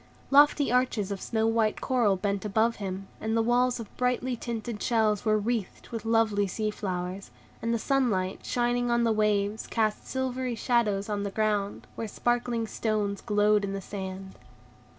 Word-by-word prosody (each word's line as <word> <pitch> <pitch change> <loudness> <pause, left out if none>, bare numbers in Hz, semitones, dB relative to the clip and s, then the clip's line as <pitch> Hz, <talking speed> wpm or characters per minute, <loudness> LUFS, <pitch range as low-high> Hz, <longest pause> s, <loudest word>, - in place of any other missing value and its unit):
Lofty 290 -1 +5
arches 245 -5 +1
of 195 - -4
snow 220 -1 0
white 225 -1 +1
coral 240 -7 +2
bent 200 0 -2
above 220 +3 +1
him, 195 -1 -5
and 220 +1 -1
the - - +4
walls 245 +1 +2
of 220 -3 -9
brightly 250 0 0
tinted 230 -2 -5
shells 220 -3 +2
were 215 -1 +4
wreathed 215 -2 -3
with 230 -2 -5
lovely 220 -3 +2
sea 215 +3 -2
flowers, 185 -1 -4 0.3
and 230 - -1
the 230 - +2
sunlight 220 -8 0
shining 245 0 0
on 235 0 +2
the 230 - +3
waves 210 -1 +1
cast 215 -2 -1
silvery 260 -1 -2
shadows 215 -4 +1
on 205 -1 -2
the 200 - -2
ground, 205 -1 -1
where 225 - -4
sparkling 240 +1 0
stones 210 -3 -1
glowed 210 -1 +3
in 195 0 -2
the 195 - -3
sand. 190 -1 -6
220 Hz, 170 wpm, -28 LUFS, 200-240 Hz, 0.3 s, Lofty